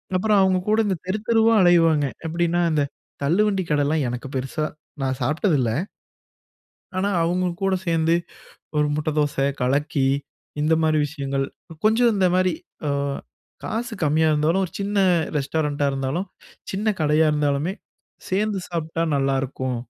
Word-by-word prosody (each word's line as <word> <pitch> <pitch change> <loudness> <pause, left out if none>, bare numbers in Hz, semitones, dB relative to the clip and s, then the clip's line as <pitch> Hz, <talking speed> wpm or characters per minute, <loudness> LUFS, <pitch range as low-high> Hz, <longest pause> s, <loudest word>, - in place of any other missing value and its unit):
அப்புறம் 205 +2 +3
அவங்க 185 -1 +3
கூட 215 +1 +3
இந்த 195 -2 0
தெருத்தெருவா 225 +3 +2
அலைவாங்க. 165 -4 +4 0.2
எப்படின்னா, 170 +1 0
அந்த 150 -2 +2 0.4
தள்ளுவண்டி 195 +5 +2
கடைலாம் 145 0 +1
எனக்கு 125 +2 -5
பெருசா 135 +4 -2 0.4
நான் 130 0 -1
சாப்பிட்டது 155 - +1
இல்ல. 115 -3 +1 1.3
ஆனா, 200 +2 +1
அவங்க 180 +2 +1 0.2
கூட 195 0 +2
சேர்ந்து 165 0 +2 0.6
ஒரு 150 0 +3
முட்டை 155 +1 -1
தோசை, 140 -2 +1 0.2
கலக்கி, 140 +2 +1 0.6
இந்த 155 +2 +2
மாரி 155 -1 +3
விஷயங்கள் 140 -2 -2 0.4
கொஞ்சம் 230 +2 +4
இந்த 190 -2 +3
மாரி, 185 -2 +2 0.3
அ - - +1 0.7
காசு 235 +1 -3
கம்மியா 155 +2 +3
இருந்தாலும். 165 +6 +2
ஒரு 165 - -12
சின்ன 200 +1 -2 0.4
ரெஸ்டாரண்ட்டா 145 0 0
இருந்தாலும் 135 +8 -2 0.5
சின்ன 210 +2 0
கடையா 155 +1 +3
இருந்தாலுமே, 150 +5 0 0.5
சேர்ந்து 200 0 0
சாப்பிட்டா 165 -1 -2
நல்லாயிருக்கும். 135 -2 -1
160 Hz, 130 wpm, -23 LUFS, 145-190 Hz, 1.3 s, அலைவாங்க